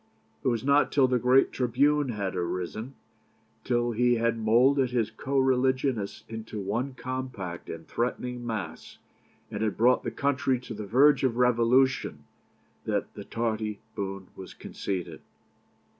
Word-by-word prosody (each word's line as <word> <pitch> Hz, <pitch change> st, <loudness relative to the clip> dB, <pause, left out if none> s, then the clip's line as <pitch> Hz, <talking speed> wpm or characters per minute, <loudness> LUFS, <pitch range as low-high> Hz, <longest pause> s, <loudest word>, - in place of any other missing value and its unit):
It -, -, -1 dB
was 120 Hz, -2 st, +1 dB
not 140 Hz, +2 st, +3 dB
till 135 Hz, -2 st, +4 dB
the 125 Hz, -1 st, +1 dB
great 125 Hz, +3 st, +4 dB
tribune 135 Hz, +3 st, +2 dB
had 100 Hz, -5 st, -3 dB
arisen, 90 Hz, +8 st, -3 dB, 0.7 s
till 120 Hz, -1 st, +1 dB
he 120 Hz, +2 st, +3 dB
had 115 Hz, 0 st, +1 dB
moulded 125 Hz, +4 st, +4 dB
his 115 Hz, -3 st, 0 dB
co 135 Hz, +5 st, -3 dB
religionists 130 Hz, -4 st, +1 dB
into 110 Hz, -1 st, -6 dB
one 120 Hz, +7 st, -2 dB
compact 125 Hz, -10 st, -5 dB
and 80 Hz, 0 st, -7 dB
threatening 125 Hz, 0 st, -2 dB
mass, 110 Hz, -4 st, -5 dB, 0.5 s
and 105 Hz, -, -4 dB
had 110 Hz, -2 st, -1 dB
brought 125 Hz, +2 st, +4 dB
the -, -, -3 dB
country 135 Hz, -2 st, 0 dB
to 125 Hz, -, -7 dB
the 105 Hz, -1 st, -6 dB
verge 140 Hz, +8 st, +5 dB
of 125 Hz, -3 st, +1 dB
revolution, 125 Hz, +2 st, +2 dB, 0.6 s
that -, -, -2 dB
the -, -, -8 dB
tardy 110 Hz, -2 st, -2 dB, 0.2 s
boon 95 Hz, -2 st, -5 dB
was 95 Hz, -, -10 dB
conceded. 90 Hz, -4 st, -5 dB
120 Hz, 145 wpm, -28 LUFS, 110-130 Hz, 0.7 s, verge